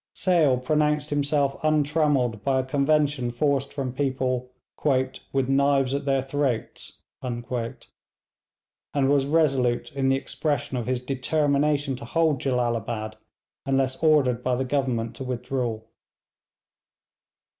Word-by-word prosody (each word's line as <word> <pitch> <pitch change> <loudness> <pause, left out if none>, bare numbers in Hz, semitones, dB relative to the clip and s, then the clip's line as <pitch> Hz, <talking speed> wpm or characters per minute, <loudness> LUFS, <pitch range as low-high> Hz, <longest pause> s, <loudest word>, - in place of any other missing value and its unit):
Sale 165 -8 +3
pronounced 150 +2 +1
himself 145 -1 0
untrammelled 150 -7 +1
by 135 -1 +2
a - - -8
convention 145 -1 +1
forced 140 +2 0
from 135 -3 -4
people 130 -2 -1 0.8
'with 135 -2 0
knives 135 -1 +2
at 140 0 -2
their 135 -2 +1
throats,' 135 -3 -3 0.2
and 120 -2 -4
was 135 +3 -4
resolute 135 -6 +1
in 135 -1 0
the 135 - +4
expression 140 -1 -2
of 120 -2 -3
his 125 -1 -1
determination 140 +1 +1
to 115 - -9
hold 155 0 +1
Jellalabad 120 -4 -1 0.5
unless 135 -1 0
ordered 145 -7 +3
by 125 -1 +1
the 130 +2 -1
Government 125 -4 -1
to - - -5
withdraw. 125 -2 -3
135 Hz, 115 wpm, -25 LUFS, 125-145 Hz, 0.8 s, the